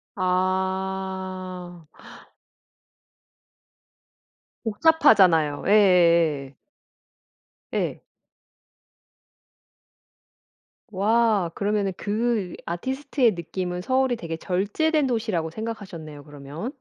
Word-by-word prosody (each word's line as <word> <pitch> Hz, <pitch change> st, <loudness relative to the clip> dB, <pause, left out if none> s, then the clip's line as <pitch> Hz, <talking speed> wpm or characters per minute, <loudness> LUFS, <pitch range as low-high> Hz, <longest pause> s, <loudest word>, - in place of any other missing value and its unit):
아. 185 Hz, -1 st, -2 dB, 2.8 s
복잡하잖아요. 195 Hz, -, +4 dB
예예예. 170 Hz, -9 st, +4 dB, 1.2 s
예. -, -, -2 dB, 2.9 s
와 210 Hz, -2 st, +2 dB
그러면은 200 Hz, 0 st, -1 dB
그 215 Hz, -3 st, -1 dB
아티스트의 255 Hz, -, 0 dB
느낌은 180 Hz, +1 st, -4 dB
서울이 260 Hz, +3 st, +1 dB
되게 165 Hz, -7 st, -6 dB
절제된 215 Hz, -, 0 dB
도시라고 215 Hz, -9 st, -1 dB
생각하셨네요 175 Hz, -8 st, -7 dB
그러면. 145 Hz, -, -7 dB
190 Hz, 165 characters per minute, -24 LUFS, 170-220 Hz, 2.9 s, 복잡하잖아요